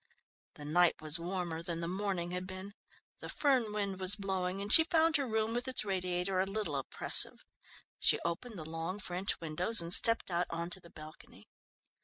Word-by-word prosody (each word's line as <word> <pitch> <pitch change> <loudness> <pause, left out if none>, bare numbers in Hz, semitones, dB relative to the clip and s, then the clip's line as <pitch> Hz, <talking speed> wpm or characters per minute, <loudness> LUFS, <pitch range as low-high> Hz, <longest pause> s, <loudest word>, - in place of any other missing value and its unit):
The 145 - -11
night 175 +3 +2
was 155 +1 -1
warmer 175 -2 -4
than 170 -1 -5
the 170 - -3
morning 185 -2 -3
had 180 +1 -5
been. 190 +2 -9 0.5
The - - -9
Föhn 260 -7 0
wind 200 -2 -4
was 190 +2 +5
blowing 190 -2 -3
and 200 +2 +2
she 320 - +12
found 325 -2 +2
her 280 -2 -3
room 220 0 -2
with 245 +2 -4
its 255 -4 -3
radiator 185 -1 -2
a 190 - 0
little 195 -6 -4
oppressive. 135 - +1 0.5
She - - +3
opened 195 +7 -5
the 155 - -8
long 165 +4 -5
French 185 0 -3
windows, 175 +7 +2
and 170 +1 +1
stepped 230 -3 +3
out 175 +1 -1
on 170 +1 -5
to 190 - -2
the 170 - -17
balcony. 155 -1 -14
185 Hz, 190 wpm, -31 LUFS, 170-210 Hz, 0.5 s, she